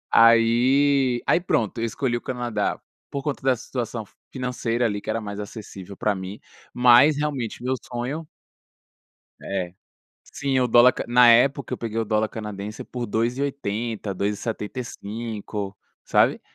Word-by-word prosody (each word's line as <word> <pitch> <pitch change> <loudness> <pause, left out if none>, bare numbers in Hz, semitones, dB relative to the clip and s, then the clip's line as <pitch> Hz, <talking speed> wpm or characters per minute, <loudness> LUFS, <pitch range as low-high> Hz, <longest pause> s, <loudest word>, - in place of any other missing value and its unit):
Aí 125 +3 +4
aí - - +4
pronto, 115 - 0
eu - - +1
escolhi 120 +2 -1
o - - -8
Canadá, 120 -3 -2 0.3
por 140 -1 -4
conta 145 -2 -3
da 130 -1 +3
situação 115 -1 -4 0.3
financeira 125 -2 -1
ali 105 -2 -1
que - - -8
era - - 0
mais 100 -2 -6
acessível 100 -2 -8
para 105 - +1
mim, 95 +2 -7 0.3
mas 125 +4 +6
realmente 140 -6 -3
meu 130 +1 0
sonho 125 +6 -4 1.2
É, 90 -3 -3 0.5
sim, 135 -2 -1
o 125 - +2
dólar 120 +2 +6
na 120 0 +6
época, 130 +3 +4
eu - - -3
peguei 115 -1 -3
o - - +1
dólar 110 0 +1
canadense 105 -1 -6
por 125 -1 -5
2,80, 115 -2 -2
2,75, 105 0 -4 0.3
sabe. - - +3
120 Hz, 140 wpm, -24 LUFS, 105-125 Hz, 1.2 s, mas